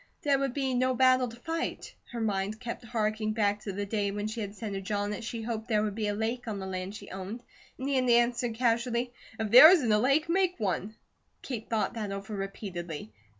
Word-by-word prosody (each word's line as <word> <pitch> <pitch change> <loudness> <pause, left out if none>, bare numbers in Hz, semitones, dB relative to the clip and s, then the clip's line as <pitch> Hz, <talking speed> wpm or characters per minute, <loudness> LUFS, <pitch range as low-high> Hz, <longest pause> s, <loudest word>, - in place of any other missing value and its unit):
There 280 -2 +3
would 275 -2 -1
be 270 -2 0
no 255 +1 +2
battle 255 0 +4
to 230 - -9
fight. 325 +6 -4 0.2
Her 240 - -4
mind 205 0 -1
kept 240 0 -6
harking 215 -2 -1
back 205 -2 +1
to 205 -1 -5
the 200 +1 -3
day 205 0 -1
when 205 +1 -3
she 220 +1 -3
had 205 0 -5
said 215 -2 -5
to 195 - -3
John 205 +1 -2
that 210 +3 -5
she 230 0 -4
hoped 225 -1 -4
there 215 -2 +2
would 210 -1 -1
be 215 0 -2
a 205 - -1
lake 230 +3 -2
on 215 -2 -3
the 190 - -5
land 190 +1 -4
she 205 -1 -10
owned, 195 +6 -6 0.3
and 260 - -4
he 280 -1 +1
had 255 -1 +2
answered 240 0 +3
casually: 240 +1 0 0.3
"If 220 -2 -2
there 255 +7 +12
isn't 305 - +4
a 210 - +4
lake, 275 +7 +3
make 360 -2 +1
one!" 205 +1 -2 0.5
Kate 235 -5 -5
thought 220 -2 0
that 215 -4 -4
over 200 +2 -5
repeatedly. 175 - -6
220 Hz, 230 wpm, -29 LUFS, 205-245 Hz, 0.5 s, there